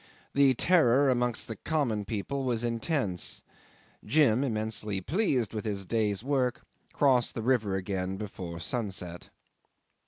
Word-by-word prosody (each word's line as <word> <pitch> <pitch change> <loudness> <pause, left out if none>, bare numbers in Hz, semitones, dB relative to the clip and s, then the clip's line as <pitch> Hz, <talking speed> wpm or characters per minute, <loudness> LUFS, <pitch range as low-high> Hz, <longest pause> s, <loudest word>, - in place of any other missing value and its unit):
The 140 -2 +4
terror 140 -4 +4
amongst 125 -2 0
the 110 - -5
common 120 -10 -1
people 110 +7 -3
was 120 -3 -1
intense. 115 - 0 0.6
Jim, 130 0 +3
immensely 110 -4 -1
pleased 130 - 0
with 110 - -3
his 100 -3 -3
day's 105 0 0
work, 130 -3 0 0.3
crossed 130 -4 +2
the 115 - -3
river 110 -6 +1
again 95 0 -3
before 95 -5 -6
sunset. 95 -4 -3
115 Hz, 125 wpm, -29 LUFS, 100-130 Hz, 0.6 s, The